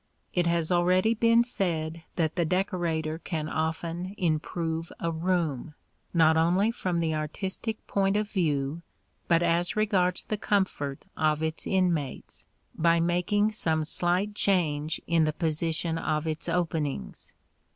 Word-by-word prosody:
It 175 -1 +2
has 170 0 +1
already 185 +5 +3
been 230 +1 +4
said 170 -8 -2
that 160 -3 0
the 175 - +2
decorator 170 -3 -1
can 160 -3 -3
often 165 +4 -3
improve 165 0 -1
a 170 - -1
room, 160 -4 -1 0.4
not 160 -2 +4
only 180 +7 +3
from 185 -7 -2
the 165 -1 0
artistic 190 +8 -4
point 195 0 +1
of 210 0 0
view, 155 -5 -1 0.5
but 170 0 +3
as 170 +1 +1
regards 190 -4 +1
the 215 - -3
comfort 190 -10 -1
of 155 0 +1
its 160 0 -2
inmates, 175 -8 -1 0.3
by 170 +1 +3
making 180 +5 +2
some 160 -7 0
slight 180 +6 0
change 160 -7 +1
in 165 -2 +3
the 155 - 0
position 165 0 -1
of 155 -1 -1
its 160 0 -3
openings. 155 - -2
170 Hz, 135 wpm, -28 LUFS, 160-185 Hz, 0.5 s, been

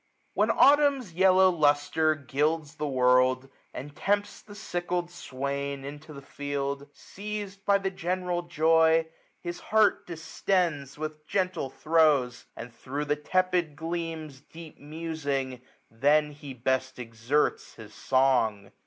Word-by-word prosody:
When - - +2
Autumn's 280 - +4
yellow 190 +1 +5
lustre 155 0 +2
gilds 150 +2 -1
the 150 - -2
world, 130 -1 +3 0.3
1320 - - -5
And 145 - -15
tempts 205 +4 -1
the 205 - -13
sickled 175 -3 -3
swain 140 -2 -4
into 145 +3 -9
the 140 -2 -10
field, 140 0 -4
Seiz'd 200 +2 -7
by 200 0 +5
the 195 -1 -3
general 180 0 -2
joy, 160 -1 +3 0.4
his 175 0 -5
heart 215 0 +2
distends 165 -4 -1
With 155 0 -6
gentle 185 -8 -1
throws 150 -5 +2
j - - -37
and, 115 0 -9
thro' 140 +5 -5
the 150 0 0
tepid 180 0 0
gleams 160 -3 -5
Deep 160 +1 -13
musing, 145 -4 -4 0.3
then 150 +6 +2
he 145 -2 -10
best 130 +2 -1
exerts 120 +4 -1
his 105 -2 -12
song. 125 -7 +1
155 Hz, 130 wpm, -27 LUFS, 140-175 Hz, 0.4 s, yellow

